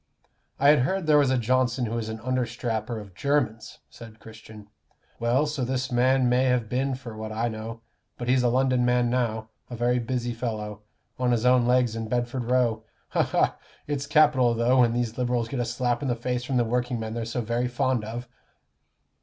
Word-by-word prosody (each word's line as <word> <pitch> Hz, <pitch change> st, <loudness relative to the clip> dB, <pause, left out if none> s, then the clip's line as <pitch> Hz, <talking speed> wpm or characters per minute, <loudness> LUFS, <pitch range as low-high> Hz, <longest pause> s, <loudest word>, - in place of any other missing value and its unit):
"I 140 Hz, +2 st, +5 dB
had 150 Hz, -, +6 dB
heard 190 Hz, +8 st, 0 dB
there 150 Hz, -1 st, +5 dB
was 140 Hz, -2 st, +3 dB
a 130 Hz, -, +2 dB
Johnson 125 Hz, +1 st, +1 dB
who 115 Hz, -, -4 dB
was 115 Hz, -2 st, -3 dB
an 110 Hz, 0 st, -5 dB
understrapper 120 Hz, -2 st, -2 dB
of 100 Hz, -3 st, -11 dB
Jermyn's," 130 Hz, -1 st, -1 dB
said 115 Hz, -1 st, -13 dB
Christian. 110 Hz, -2 st, -13 dB, 0.5 s
"Well, 120 Hz, +5 st, +2 dB
so 150 Hz, -3 st, -3 dB
this 130 Hz, +1 st, -2 dB
man 130 Hz, +1 st, +3 dB
may 125 Hz, +2 st, +3 dB
have 125 Hz, -3 st, +1 dB
been 130 Hz, +3 st, -1 dB
for 125 Hz, -4 st, -9 dB
what 110 Hz, 0 st, -6 dB
I 115 Hz, +2 st, -1 dB
know. 110 Hz, +1 st, -7 dB, 0.4 s
But 120 Hz, -, -5 dB
he's 125 Hz, +1 st, +3 dB
a 125 Hz, -, +2 dB
London 130 Hz, 0 st, +2 dB
man 125 Hz, -1 st, +2 dB
now 110 Hz, -3 st, -1 dB, 0.2 s
a 120 Hz, -, -6 dB
very 120 Hz, +1 st, +1 dB
busy 120 Hz, 0 st, -2 dB
fellow 110 Hz, -3 st, -4 dB, 0.4 s
on 125 Hz, -1 st, +1 dB
his 120 Hz, 0 st, +1 dB
own 125 Hz, -1 st, +4 dB
legs 125 Hz, -2 st, +2 dB
in 115 Hz, -1 st, -4 dB
Bedford 120 Hz, +1 st, -2 dB
Row. 120 Hz, -3 st, +1 dB, 0.3 s
Ha, -, -, +1 dB
ha! -, -, +1 dB, 0.3 s
it's 145 Hz, -1 st, -3 dB
capital, 140 Hz, -6 st, +4 dB
though, 120 Hz, +3 st, +3 dB
when 120 Hz, -2 st, +4 dB
these 120 Hz, -1 st, -2 dB
Liberals 120 Hz, -2 st, 0 dB
get 135 Hz, -, -3 dB
a 120 Hz, -, 0 dB
slap 120 Hz, +2 st, -1 dB
in 140 Hz, -, -2 dB
the 120 Hz, -, +1 dB
face 125 Hz, +1 st, -3 dB
from 130 Hz, 0 st, -1 dB
the 120 Hz, -, +3 dB
workingmen 120 Hz, -2 st, -2 dB
they're 115 Hz, 0 st, -3 dB
so 115 Hz, +2 st, -3 dB
very 120 Hz, +2 st, -1 dB
fond 125 Hz, -1 st, 0 dB
of." 120 Hz, +3 st, -6 dB
120 Hz, 205 wpm, -26 LUFS, 115-130 Hz, 0.5 s, had